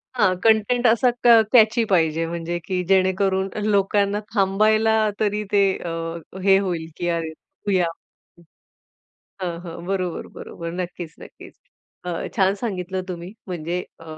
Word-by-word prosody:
हां. 200 -6 +3
कंटेंट 225 +3 +3
असा 235 +2 +4
क - - +4 0.3
कॅची 230 0 +5
पाहिजे, 165 -3 +2
म्हणजे 170 +1 -3
की 180 -1 -1
जेणेकरून 190 0 +2 0.2
लोकांना 200 0 +2
थांबायला 215 +2 +3 0.3
तरी 210 0 0
ते 200 -1 +4 0.2
अ, 175 - -6 0.5
हे 195 0 +6
होईल, 175 -4 -3
की 175 - -2
अरे 165 -1 -1
बघूया. 180 +3 -2 1.6
हां, 170 -2 -3
हां. 170 -1 -8
बरोबर, 185 -3 -2
बरोबर. 170 0 -7
नक्कीच, 175 -3 -6
नक्कीच. - - -13 0.5
अ, 180 - -3 0.3
छान 190 0 +3
सांगितलं 190 -4 -4
तुम्ही, 175 +2 -6
म्हणजे 175 0 -3 0.2
अ, - - -12
190 Hz, 130 wpm, -22 LUFS, 175-205 Hz, 1.6 s, हे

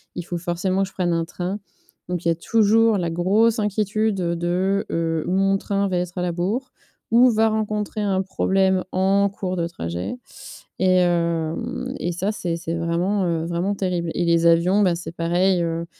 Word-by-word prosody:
il 175 - -4
faut 175 0 -4
forcément 185 +2 -1
que 195 - -4
je - - -24
prenne 175 -2 0
un 165 0 0
train. 180 +4 -4 0.5
Donc 180 -1 -3
il - - +3
y - - +4
a - - 0
toujours 220 +4 +3
la 170 -3 -1
grosse 210 +7 +2
inquiétude 210 +1 0
de 180 +3 0
heu, 165 -1 -1
ou - - -1
mon 195 +1 +2
train 200 0 -1
va 185 - -1
être 180 +1 -4
à - - -1
la 180 -1 0
bourre 215 +10 -2 0.4
ou 245 +2 +6
va 220 0 +3
rencontrer 215 0 -2
un 195 -2 +1
problème 190 0 +1
en 195 +2 +2
cours 190 -2 -4
de 170 -1 0
trajet. 85 - -5 0.6
Et 185 0 +3
hem 175 +8 -1
et 175 - -1
ça, 190 +4 -1
c'est 175 -5 -3
c'est 165 0 -4
vraiment, 170 +4 0
heu, 165 -2 -1
vraiment 175 +4 -1
terrible. 180 -4 -2
Et 175 - 0
les 170 0 +3
avions, 175 +5 +4
bah, 180 -3 +3
c'est 170 -1 -7
pareil. 175 +2 +1
Heu, 165 0 -2
185 Hz, 195 wpm, -22 LUFS, 170-200 Hz, 0.6 s, ou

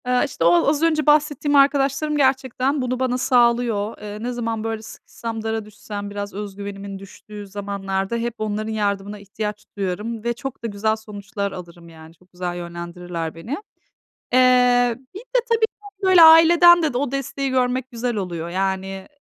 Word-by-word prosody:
Eee, 250 0 +3
işte, 275 - -4
o 175 +4 +4
az 295 +2 +2
önce 310 -2 +2
bahsettiğim 295 -1 +3
arkadaşlarım 280 +1 +3
gerçekten 265 0 +1
bunu 255 0 -2
bana 255 -1 0
sağlıyor. 235 -4 +2
Eee, 210 +1 -7
ne 245 - -2
zaman, 230 -2 -3
böyle, 225 -1 -3
sıkışsam, 225 0 -7
dara 220 -1 -2
düşsem, 205 -1 -7
biraz 205 0 -5
özgüvenimin 200 -1 -7
düştüğü 205 +1 -11
zamanlarda 195 +1 -3
hep 235 0 -2
onların 215 0 -3
yardımına 205 -1 -2
ihtiyaç 210 +1 -6
duyarım 210 +4 -3
ve 235 0 0
çok 270 0 -7
da - - -1
güzel 215 +1 0
sonuçlar 205 -1 -5
alırım, 170 -2 -10
yani. 160 0 -14
Çok 180 +2 -27
güzel 180 -1 -4
yönlendirirler 170 -1 -6
beni. 165 +9 -9 0.8
Eee, 250 -1 +4 0.2
bir 395 - -7
de - - 0
tabii 460 -1 +2
ki 405 -2 -18
böyle 375 -3 +6
aileden 340 +2 +8
de 285 -6 0
o 280 -1 -1
desteği 275 0 -3
görmek 255 0 0
güzel 240 0 -2
oluyor. 170 -4 -4
Yani, 190 +1 -3
225 Hz, 160 wpm, -22 LUFS, 200-260 Hz, 0.8 s, aileden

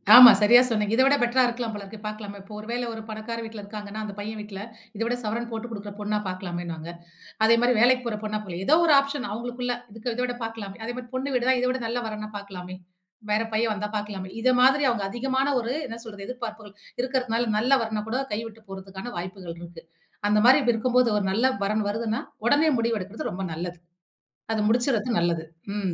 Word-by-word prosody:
ஆமா, 245 -2 +13
சரியா 235 +4 +7
சொன்னீங்க. 215 -2 0
இத 260 - +4
விட 275 +1 +5
பெட்டர்ரா 245 +2 +3
இருக்கலாம் 235 -2 -3
போல 205 - -6
இருக்கு 200 +3 -10
பார்க்கலாமே. 210 -1 -6
இப்போ 200 +2 -13
ஒரு 215 - -9
வேள 245 +1 -1
ஒரு 220 - -6
பணக்கார 220 +2 -5
வீட்ல 220 -1 -8
இருக்கிறாங்கனா, 205 0 -7
அந்த 205 - -5
பையன் 215 +1 -5
வீட்ல 210 -2 -8 0.4
இத 215 - -6
விட 240 +1 0
சவரன் 230 +3 -2
போட்டுக் 230 +1 -5
குடுக்கிற 205 -1 -6
பொண்ணா 210 0 -1
பார்க்கலாமேனுவாங்க. 175 -3 -5 0.5
அதே 230 +1 +6
மாரி 245 +1 +4
வேலைக்கு 250 +1 +5
போற 215 -2 -2
பொண்ணா 215 0 -2
போலாம். 180 -2 -6
ஏதோ 310 - +6
ஒரு 310 - +5
ஆப்ஷன் 275 -1 -2
அவங்களுக்குள்ள 245 +2 -3 0.3
இத 235 0 -3
விட 245 -1 -3
பார்க்கலாமே. 225 -4 -6
அதே 240 - -3
மாரி 250 -1 -7
பொண்ணு 270 +1 -2
வீடு 245 0 +1
தான், 260 -1 +4
இத 250 - +2
விட 260 - -2
நல்ல 240 +2 -1
வரன் 215 -1 -4
வந்தா 215 0 -6
பார்க்கலாமே. 185 -2 -8 0.6
வேற 210 - +3
பையன் 220 0 +2
வந்தா 210 0 -4
பார்க்கலாமே. 200 -3 -5
இத 255 - +4
மாதிரி 270 +3 +5
அவங்க 235 -4 -1
அதிகமான 265 +4 0
ஒரு 235 +2 -2
என்ன 230 - -6
சொல்றது 205 -4 -9
எதிர்பார்ப்புகள் 220 -5 -7 0.3
இருக்கிறதனால 250 -3 0
நல்ல 250 +5 +3
வரன் 215 -1 -3
கூட 255 - 0
கையவுட்டுப் 225 0 -6
போறதுக்கான 195 +4 -7
வாய்ப்புகள் 180 -1 -6
இருக்கு. 170 -1 -10 0.5
அந்த 210 - +4
மாதிரி 265 +3 +8
இருக்கும் 245 +2 -1
போது 250 -2 +5
ஒரு 205 - 0
நல்ல 230 +6 +2 0.2
வரன் 210 +1 0
வருதுனா, 220 +1 -1 0.3
உடனே 290 +5 +4
முடிவு 230 -1 +1
எடுக்கிறது 195 +3 -5
ரொம்ப 190 +1 -4
நல்லது. 175 +2 -5 0.8
அத 220 - 0
முடிச்சறது 240 0 +1
நல்லது. 170 -1 0 0.3
ம். 190 -4 -1
220 Hz, 205 wpm, -26 LUFS, 205-245 Hz, 0.8 s, ஆமா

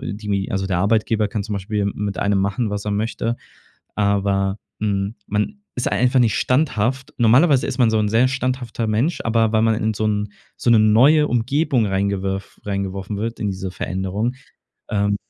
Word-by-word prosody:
die 105 -5 -6
mi 100 -1 -1
also 95 0 -1
der 95 -2 0
Arbeitgeber 110 +2 +1
kann 105 0 -3
zum 105 +1 -4
Beispiel 100 +2 -3
m 100 0 -1
mit 100 -2 -3
einem 100 -1 +1
machen, 100 +4 0
was 105 -1 -3
er 105 - -2
möchte. 115 +2 -2 0.6
Aber, 100 -1 +1 0.2
hm, 100 0 -1
man 150 - -2
ist 125 - -1
einfach 125 +1 +3
nicht 115 -3 +3
standhaft. 130 -2 0
Normalerweise 130 +5 +4
ist 125 - -4
man 120 -3 +4
so 110 - +2
'n 105 -1 +1
sehr 115 +4 +4
standhafter 130 -3 -2
Mensch, 115 +11 0
aber 115 -1 +2
weil 110 -1 +2
man 115 0 +3
in 110 0 -1
so 110 +1 -2
'n 105 -1 -2 0.2
so - - 0
'ne 115 - +6
neue 130 +9 +5
Umgebung 125 +1 +1
rein 100 - -2 0.2
reingewerf 95 0 -4
reingeworfen 100 0 -3
wird 115 +3 -4
in 105 -2 -1
diese 95 0 -5
Veränderung. 95 +6 -2 0.6
Ähm 100 0 +1
110 Hz, 190 wpm, -21 LUFS, 100-120 Hz, 0.6 s, ne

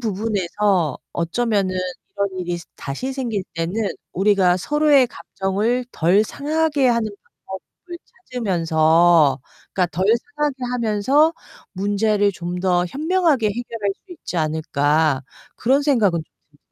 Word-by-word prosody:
부분에서 200 - 0
어쩌면은 195 +2 0 0.4
이런 200 -1 -1
일이 175 -1 -3 0.2
다시 145 - -4
생길 235 -7 -3
때는 165 +2 -3 0.4
'우리가 190 -2 +3
서로의 295 +4 +3
감정을 215 +5 -2
덜 180 +6 +3
상하게 295 +1 0
하는 235 -3 +1 0.4
방법을 265 - -10 0.3
찾으면서 165 - +3 0.3
그니까 185 -2 +1
덜 185 +4 0 0.3
상하게 295 -2 0 0.2
하면서 250 +7 +2 0.4
문제를 205 +1 +1
좀 175 0 -5
더 180 -1 +2
현명하게 310 - +1
해결할 215 -2 -3
수 365 - -10
있지 325 - -7
않을까.' 155 -2 +1 0.3
그런 270 +4 +2
생각은 215 - +2
좀 150 -1 -34
200 Hz, 265 characters per minute, -21 LUFS, 175-250 Hz, 0.4 s, 우리가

